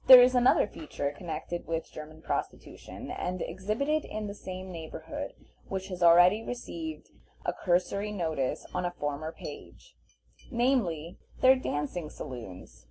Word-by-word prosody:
There 255 -1 +13
is 255 +1 +5
another 250 0 +5
feature 150 -6 -4
connected 170 +1 -5
with 165 0 -2
German 155 +1 -9
prostitution, - - -4
and 180 +1 -2
exhibited 215 - 0
in 215 0 -4
the 200 - -4
same 185 -1 -7
neighborhood, 165 -2 -6 0.3
which 190 0 -4
has 180 -1 -5
already 175 +5 +7
received 315 +7 -6 0.4
a - - +1
cursory 190 +3 +1
notice 160 -9 -1
on 180 - 0
a 175 0 -2
former 145 +2 -2
page, - - -10 0.6
namely, 225 - +1 0.2
their 260 +1 +8
dancing 155 - -2
saloons. 115 -12 -8
180 Hz, 135 wpm, -30 LUFS, 160-215 Hz, 0.6 s, There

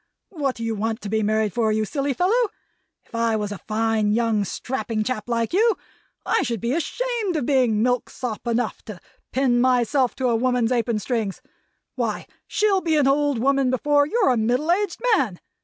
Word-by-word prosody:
What 285 -8 -2
do 230 - -6
you 225 0 -1
want 220 +2 -2
to 205 - -5
be 220 +1 +1
married 215 -1 +1
for, 225 -2 +1
you 215 0 +1
silly 280 +4 -2
fellow? 420 - +2 0.6
If - - -29
I 230 -1 +1
was 210 -1 -2
a 205 - -6
fine, 220 -1 0
young, 225 -2 +1
strapping 230 +1 -3
chap 230 -1 -3
like 230 +1 -1
you, 435 +2 +3 0.5
I - - +2
should 235 -2 -2
be 235 +4 -1
ashamed 445 +3 -2
of 295 -6 -1
being 245 -6 +2
milksop 245 -1 -2
enough 235 -1 -1
to 210 -6 -8 0.3
pin 250 -2 +2
myself 250 0 +2
to 260 -2 0
a 235 - +2
woman's 245 0 +1
apron 235 -2 +1
strings! 215 -3 -2 0.5
Why, - - -2 0.2
she'll 410 -3 +2
be 325 -3 +1
an 290 - +3
old 285 -1 +2
woman 270 +2 +2
before 285 +3 +2
you're 400 - +2
a 245 - +1
middle 250 +9 +1
aged 400 +2 0
man! 220 - -1
245 Hz, 190 wpm, -23 LUFS, 220-285 Hz, 0.6 s, you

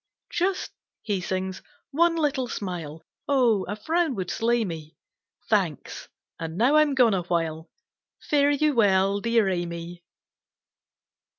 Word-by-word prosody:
"Just," 370 +2 -1 0.3
he 200 -4 -1
sings, 190 +1 -3 0.3
"one 335 +3 +3
little 285 -5 0
smile; 170 -8 -5 0.2
O, 240 -8 +3
a 205 - -4
frown 320 +6 0
would 185 -3 -3
slay 235 0 +1
me! 160 -4 -7 0.5
Thanks, - - -1 0.3
and 165 0 -5
now 255 +8 +4
I'm 300 -2 +3
gone 245 -5 +5
awhile, 165 -3 -2 0.5
Fare 285 -1 +2
you 295 +1 +2
well, 200 -3 +3
dear 230 -1 +2
Amy!" 175 -1 -4
210 Hz, 120 wpm, -25 LUFS, 175-275 Hz, 0.5 s, gone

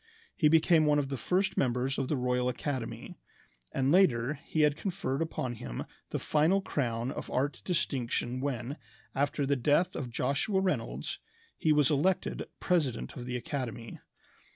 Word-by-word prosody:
He 155 - +4
became 160 0 +5
one 150 0 +4
of 140 -2 0
the 140 - -2
first 185 - 0
members 130 +1 +1
of 135 - -1
the 150 - 0
Royal 125 0 +1
Academy; 125 - -4 0.5
and 135 0 +1
later 140 -8 +4
he 155 +2 -2
had 150 -1 +4
conferred 155 -6 -2
upon 130 -6 -2
him - - -5 0.3
the - - -2
final 160 +6 +3
crown 120 -8 -1
of - - -6
art 140 +3 -1
distinction 130 -7 -1
when, 135 0 -3 0.4
after 140 +1 0
the 140 +1 +2
death 150 +8 +2
of 130 -5 -3
Joshua 140 - 0
Reynolds, 190 -1 -2 0.4
he 155 - +1
was 150 -1 +4
elected 165 +6 +1
president 150 -10 0
of 125 -1 -7
the 125 0 -2
academy. 120 -3 -5
140 Hz, 155 wpm, -30 LUFS, 125-155 Hz, 0.5 s, became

